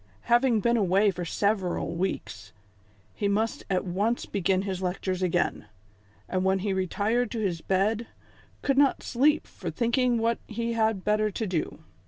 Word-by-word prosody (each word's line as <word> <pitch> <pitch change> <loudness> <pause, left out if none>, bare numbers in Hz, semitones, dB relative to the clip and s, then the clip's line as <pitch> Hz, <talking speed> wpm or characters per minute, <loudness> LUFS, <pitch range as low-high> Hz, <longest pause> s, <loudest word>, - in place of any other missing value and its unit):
Having 240 -2 +3
been 235 +2 +2
away 200 0 +3
for 175 -1 -5
several 190 -2 0
weeks, 105 - -4 0.6
he 205 - -1
must 215 +3 0
at 185 -1 0
once 205 +6 0
begin 190 -1 0
his 190 -2 -3
lectures 185 0 -2
again; 175 - 0 0.6
and 185 0 -1
when 190 0 +3
he 200 - +1
retired 210 +6 0
to 230 - -4
his 180 -6 -1
bed, 210 +6 0 0.6
could 275 -1 +2
not 280 -2 +3
sleep 290 +5 +2
for - - -7
thinking 245 0 +1
what 230 +1 +1
he 230 +1 -2
had 220 -4 +1
better 215 0 +2
do. 185 -6 -3
205 Hz, 155 wpm, -27 LUFS, 185-230 Hz, 0.6 s, Having